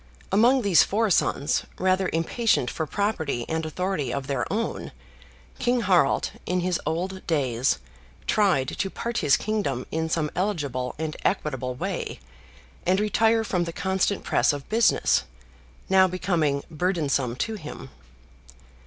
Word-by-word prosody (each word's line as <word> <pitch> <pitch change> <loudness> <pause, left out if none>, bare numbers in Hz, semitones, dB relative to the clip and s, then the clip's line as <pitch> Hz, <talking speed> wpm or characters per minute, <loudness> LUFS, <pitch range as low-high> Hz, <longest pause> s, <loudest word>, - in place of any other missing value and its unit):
Among 240 +6 +4
these 195 -5 +6
four 215 +1 +1
sons, 145 -3 +2 0.2
rather 185 0 +2
impatient 165 - +1
for 160 - -3
property 160 - -1
and 160 0 -1
authority 170 -5 -2
of 140 +1 -3
their 135 -2 -2
own, 225 +3 -3 0.7
King 245 0 +2
Harald, 180 -8 +3 0.2
in 180 0 +1
his 180 -1 0
old 185 +3 -3
days, 130 - +1 0.5
tried 185 -11 +2
to 195 - -2
part 235 +4 -3
his 140 - +4
kingdom 200 - -2
in 160 0 -1
some 155 -2 0
eligible 150 -10 -2
and 155 0 -3
equitable 130 -8 -1
way, - - -4 0.6
and 185 +2 +2
retire 225 +2 +3
from 180 -5 0
the 170 - -4
constant 190 +2 0
press - - +2
of 145 -1 -6
business, 215 - +3 0.7
now 190 0 +5
becoming 175 -6 0
burdensome 150 -7 0
to 225 - -2
him. 155 - -8
175 Hz, 135 wpm, -25 LUFS, 140-200 Hz, 0.7 s, these